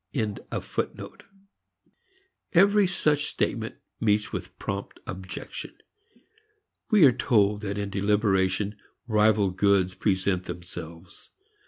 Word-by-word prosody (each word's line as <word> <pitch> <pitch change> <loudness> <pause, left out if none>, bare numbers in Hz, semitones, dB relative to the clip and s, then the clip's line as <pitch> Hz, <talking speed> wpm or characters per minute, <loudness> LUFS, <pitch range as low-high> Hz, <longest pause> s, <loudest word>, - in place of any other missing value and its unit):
Every 200 +2 +6
such 150 -5 +1
statement - - -2 0.2
meets 105 -1 +1
with - - -6
prompt - - -5
objection. 95 - -7 1.1
We 210 -8 +7
are 135 - +8
told 105 -4 +2
that 100 -1 -3
in 100 -1 -3
deliberation 100 0 +1 0.3
rival 105 -3 +3
goods 95 -1 +2
present 95 -2 0
themselves. 85 0 -9
100 Hz, 85 wpm, -26 LUFS, 95-115 Hz, 1.1 s, are